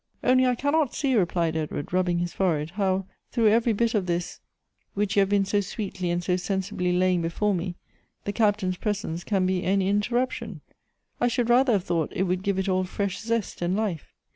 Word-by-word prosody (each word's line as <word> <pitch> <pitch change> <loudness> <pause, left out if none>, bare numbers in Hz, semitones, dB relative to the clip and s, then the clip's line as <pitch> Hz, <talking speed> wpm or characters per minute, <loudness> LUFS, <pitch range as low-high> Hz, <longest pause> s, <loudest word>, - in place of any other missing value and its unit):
" - - -39
Only 255 +1 +4
I 250 - +2
cannot 285 +2 +1
see," 275 -3 +1
replied 170 -6 +1
Edward, 155 0 -4
rubbing 180 -1 +2
his 175 0 -2
fore 180 -5 +1
head, 150 +2 -5
"how, 190 -1 0 0.3
through 230 -3 +3
every 230 +2 +3
bit 230 +2 +1
of 200 -4 0
this 175 0 -2 0.6
which 205 0 0
you - - +5
have 195 -1 +3
been 200 -1 +3
so 205 +1 +1
sweetly 190 -2 -4
and 175 0 -1
so 180 0 +1
sensibly 185 0 -2
laying 180 0 +2
before 185 +5 0
me, 175 0 -3 0.5
tbo 205 - -2
Captain's 205 -5 +1
presence 200 -5 -3
can 195 -3 +1
be 185 -1 0
any 190 0 +1
interruption; 240 +6 -1 0.6
I 245 - +3
should 240 0 +1
rather 250 0 +5
have 195 -4 +1
thought 170 -4 -1
it 190 - +1
would 180 -1 0
give 200 -1 -1
it 190 0 -1
all 185 -1 +2
fresh 195 +1 -3
zest 230 -4 -2
and 175 +2 0
life. 205 -7 -2
195 Hz, 210 wpm, -26 LUFS, 180-215 Hz, 0.6 s, you